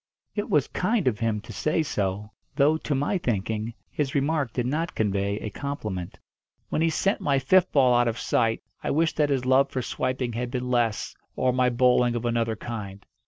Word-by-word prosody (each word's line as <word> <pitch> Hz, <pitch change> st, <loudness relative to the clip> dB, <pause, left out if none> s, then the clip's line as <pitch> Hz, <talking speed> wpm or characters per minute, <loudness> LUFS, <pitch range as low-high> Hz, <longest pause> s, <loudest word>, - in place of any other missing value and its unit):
It 205 Hz, -, -3 dB
was 145 Hz, -3 st, +3 dB
kind 210 Hz, -, 0 dB
of 110 Hz, -5 st, +1 dB
him 110 Hz, -2 st, 0 dB
to -, -, -10 dB
say 155 Hz, +1 st, 0 dB
so; 105 Hz, -5 st, -2 dB, 0.2 s
though, 145 Hz, +3 st, +4 dB
to 155 Hz, -2 st, -2 dB
my 145 Hz, +8 st, 0 dB
thinking, 110 Hz, -, -2 dB, 0.2 s
his 145 Hz, -2 st, -2 dB
remark 140 Hz, -2 st, +1 dB
did 125 Hz, 0 st, -2 dB
not 155 Hz, +6 st, -2 dB
convey 100 Hz, -1 st, 0 dB
a 110 Hz, -, -5 dB
compliment. 105 Hz, -10 st, -5 dB, 0.5 s
When -, -, 0 dB
he 165 Hz, -, +3 dB
sent 195 Hz, +5 st, 0 dB
my 140 Hz, -1 st, +2 dB
fifth 180 Hz, +7 st, +3 dB
ball 130 Hz, -3 st, +4 dB
out 120 Hz, 0 st, +4 dB
of 115 Hz, 0 st, -1 dB
sight 115 Hz, -1 st, 0 dB, 0.2 s
I -, -, -1 dB
wished 160 Hz, +2 st, +1 dB
that 150 Hz, -1 st, +3 dB
his 130 Hz, -3 st, 0 dB
love 135 Hz, +2 st, +4 dB
for 130 Hz, -2 st, -3 dB
swiping 130 Hz, -1 st, -2 dB
had 120 Hz, +2 st, -3 dB
been 125 Hz, 0 st, -3 dB
less, 120 Hz, -3 st, 0 dB, 0.2 s
or 130 Hz, -1 st, +1 dB
my 125 Hz, 0 st, +3 dB
bowling 125 Hz, 0 st, +3 dB
of 120 Hz, 0 st, -3 dB
another 115 Hz, -1 st, 0 dB
kind. 100 Hz, -3 st, -7 dB
125 Hz, 200 wpm, -26 LUFS, 115-145 Hz, 0.5 s, though